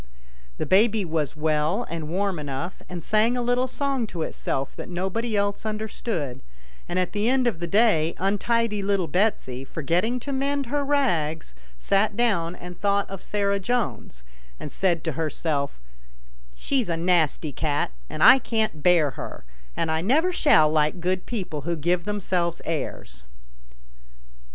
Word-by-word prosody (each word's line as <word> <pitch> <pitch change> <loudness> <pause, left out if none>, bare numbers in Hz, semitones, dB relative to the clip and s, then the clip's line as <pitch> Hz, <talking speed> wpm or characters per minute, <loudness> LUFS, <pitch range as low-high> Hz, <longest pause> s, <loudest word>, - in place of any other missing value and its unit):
The - - -2
baby 210 +1 +3
was 155 -4 -2
well 155 +7 +1
and 160 -2 -5
warm 190 0 -1
enough, 145 +5 -5
and 175 -3 -6
sang 220 +3 +2
a - - 0
little 245 +1 +1
song 270 -2 -1
to 170 -5 -4
itself 135 -3 -3
that - - -7
no 185 +2 -2
body 230 +1 -1
else 200 0 0
understood, 215 - -3 0.5
and 175 - -2
at 185 -1 0
the 210 +2 0
end 260 0 +2
of 230 -9 0
the 170 - -3
day 170 -5 +3
untidy 210 +2 +1
little 195 -2 +1
Betsy, 160 - 0
forgetting 175 - -1
to 280 - -5
mend 280 +1 0
her 285 +4 -1
rags, 170 - 0 0.2
sat 200 - +1
down 180 -8 +1
and 180 0 -10
thought 200 0 +2
of 195 - -6
Sarah 200 -1 0
Jones, 205 - -2 0.4
and - - -7
said 175 -4 0
to 160 - -1
herself, 155 - -2 0.4
" - - -27
She's 255 - -1
a 165 - 0
nasty 165 -3 +1
cat, 145 +1 -1 0.2
and - - -2
I 265 - +9
can't 220 -10 -1
bear 165 -4 +4
her, 115 - -8 0.3
and 160 - 0
I 160 0 0
never 310 - +2
shall 155 - +5
like 155 +3 +1
good 180 +1 -1
people 185 -10 -4
who 170 +4 -2
give 170 +3 0
themselves 185 -5 -1
airs." 65 - -4
185 Hz, 160 wpm, -25 LUFS, 160-220 Hz, 0.5 s, I